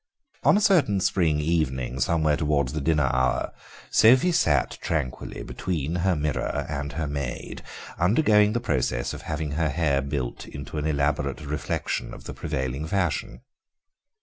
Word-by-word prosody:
On -, -, +5 dB
a -, -, +1 dB
certain 170 Hz, -, +4 dB
spring 85 Hz, -5 st, +2 dB
evening, 65 Hz, -5 st, -1 dB
somewhere 75 Hz, +2 st, +2 dB
towards 75 Hz, -4 st, 0 dB
the 75 Hz, -, -2 dB
dinner 75 Hz, -1 st, +2 dB
hour, 65 Hz, -1 st, +1 dB, 0.4 s
Sophie 130 Hz, +10 st, +6 dB
sat 75 Hz, -, +2 dB
tranquilly 70 Hz, -6 st, -3 dB
between 85 Hz, -2 st, -3 dB
her 90 Hz, +1 st, +2 dB
mirror 75 Hz, -1 st, -1 dB
and 75 Hz, -2 st, -4 dB
her 80 Hz, -1 st, -2 dB
maid, 70 Hz, -3 st, -4 dB, 0.4 s
undergoing 105 Hz, -, +4 dB
the 120 Hz, -, +1 dB
process 65 Hz, -, -1 dB
of -, -, -7 dB
having 75 Hz, -1 st, -3 dB
her 80 Hz, +1 st, 0 dB
hair 70 Hz, -2 st, +1 dB
built 70 Hz, -3 st, -4 dB
into 70 Hz, +2 st, -6 dB
an 75 Hz, -, -1 dB
elaborate 70 Hz, -1 st, 0 dB
reflection 75 Hz, +1 st, -3 dB
of -, -, -12 dB
the -, -, -7 dB
prevailing 70 Hz, -1 st, -3 dB
fashion. 85 Hz, -, -1 dB
75 Hz, 150 wpm, -25 LUFS, 70-85 Hz, 0.4 s, Sophie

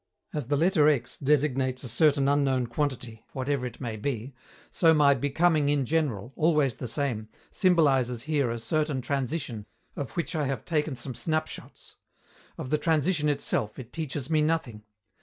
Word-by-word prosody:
As 150 Hz, -6 st, -3 dB
the 145 Hz, +1 st, +1 dB
letter 160 Hz, -2 st, +4 dB
x 135 Hz, -6 st, 0 dB
designates 135 Hz, -2 st, +1 dB
a -, -, -5 dB
certain 140 Hz, +3 st, +3 dB
unknown 140 Hz, -3 st, +2 dB
quantity, 120 Hz, -3 st, -3 dB
whatever 130 Hz, -1 st, -1 dB
it 120 Hz, -, -11 dB
may 115 Hz, -4 st, -4 dB
be, 125 Hz, +2 st, -3 dB, 0.4 s
so 165 Hz, -2 st, +4 dB
my 145 Hz, -2 st, +5 dB
"becoming 145 Hz, +3 st, +2 dB
in 145 Hz, -2 st, +1 dB
general," 135 Hz, -7 st, -1 dB
always 150 Hz, -6 st, +2 dB
the 125 Hz, -, -5 dB
same, 115 Hz, -4 st, -2 dB, 0.2 s
symbolizes 135 Hz, -, +2 dB
here 145 Hz, -5 st, 0 dB
a 115 Hz, -, -2 dB
certain 150 Hz, +2 st, -1 dB
transition 130 Hz, -4 st, -3 dB, 0.3 s
of 140 Hz, -5 st, -5 dB
which 170 Hz, -, -2 dB
I 150 Hz, -4 st, 0 dB
have 135 Hz, -4 st, -3 dB
taken 150 Hz, -3 st, 0 dB
some 125 Hz, +1 st, -6 dB
snapshots; 155 Hz, +4 st, -4 dB, 0.6 s
of 130 Hz, -, -6 dB
the 150 Hz, -, +2 dB
transition 155 Hz, 0 st, +1 dB
itself 125 Hz, -7 st, -1 dB
it 125 Hz, -2 st, -10 dB
teaches 145 Hz, -4 st, -3 dB
me 155 Hz, -1 st, +2 dB
nothing. 150 Hz, -9 st, -1 dB
140 Hz, 160 wpm, -27 LUFS, 125-155 Hz, 0.6 s, my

